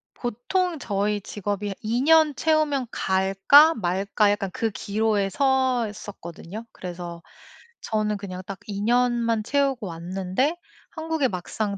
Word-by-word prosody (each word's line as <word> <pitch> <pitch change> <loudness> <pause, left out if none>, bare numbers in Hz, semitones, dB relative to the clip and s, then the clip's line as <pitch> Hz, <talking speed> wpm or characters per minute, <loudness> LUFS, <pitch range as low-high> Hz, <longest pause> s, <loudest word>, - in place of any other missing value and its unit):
보통 315 - -2
저희 205 -2 -1
직업이 205 0 -4
'2 230 +3 0
년 310 0 +5
채우면 300 -4 +1
갈까? 195 +12 +5
말까?' 200 +1 +1
약간 200 -2 -2
그 225 - -1
기로에 205 0 0
서 260 -1 +2
있었거든요. 205 0 -9
그래서 175 -2 -7 0.6
저는 215 -1 -1
그냥 185 -2 -7
딱 195 -1 -6
2 200 -1 -4
년만 235 -1 +2
채우고 270 -3 0
왔는데 185 - -2 0.4
한국에 320 -3 -1
막상 200 +2 -3
215 Hz, 245 characters per minute, -24 LUFS, 195-260 Hz, 0.6 s, 년